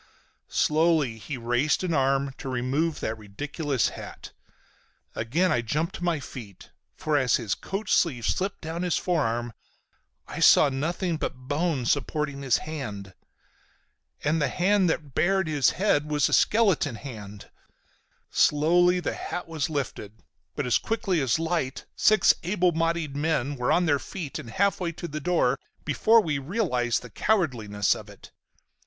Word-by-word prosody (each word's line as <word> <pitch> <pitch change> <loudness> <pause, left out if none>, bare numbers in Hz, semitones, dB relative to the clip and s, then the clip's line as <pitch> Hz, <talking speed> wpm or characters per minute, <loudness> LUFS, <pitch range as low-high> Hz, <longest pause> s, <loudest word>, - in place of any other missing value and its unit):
Slowly 155 -7 +2
he 135 +5 -6
raised 120 +7 +1
an 175 -2 -1
arm 135 -1 +1
to 135 - -5
remove 135 +6 -1
that 110 0 -3
ridiculous 140 - -2
hat. - - -10 0.8
Again 155 +12 0
I 120 - +2
jumped 150 +8 -2
to - - -8
my 170 -3 +1
feet. 115 -8 -10 0.2
For 155 -1 0
as 125 -3 +3
his 110 -5 -1
coat 195 +3 -5
sleeve 130 -9 +2
slipped 195 +1 -1
down 165 +1 -4
his 180 -2 0
forearm 120 -9 -1 0.7
I - - -6
saw 145 - +6
nothing 165 +5 -2
but 130 -3 -5
bone 145 -3 0
supporting 145 +2 -1
his 135 -3 +2
hand. 105 -11 -6 1.1
And 150 +2 +1
the 145 - +2
hand 190 0 +2
that 160 - 0
then 150 - -17
bared 190 +4 +2
his 145 -4 +3
head 150 -7 +1
was 150 -2 +2
a - - -3
skeleton 195 - +3
hand! 105 -6 -9 0.8
Slowly 175 +4 +4
the - - -2
hat 175 - -5
was 160 -3 -2
lifted, 135 -8 -4 0.4
but 145 - -2
as 125 - +3
quickly 195 -7 -1
as 130 -1 +2
light 165 -5 -2
six 215 -4 +5
able 180 0 +1
bodied 165 -3 -1
men 145 -2 0
were 125 -2 0
on 175 - +3
their 145 -3 +2
feet 155 -1 -6
and 130 -7 -9
half 200 +8 +1
way 175 -2 -2
to 175 - -6
the 155 -1 -5
door 140 -6 +1 0.3
before 220 +9 +4
we 150 -7 -1
realized 135 - -1
the 125 - -11
cowardliness 115 - +1
of - - -9
it. - - -14
150 Hz, 160 wpm, -26 LUFS, 130-170 Hz, 1.1 s, saw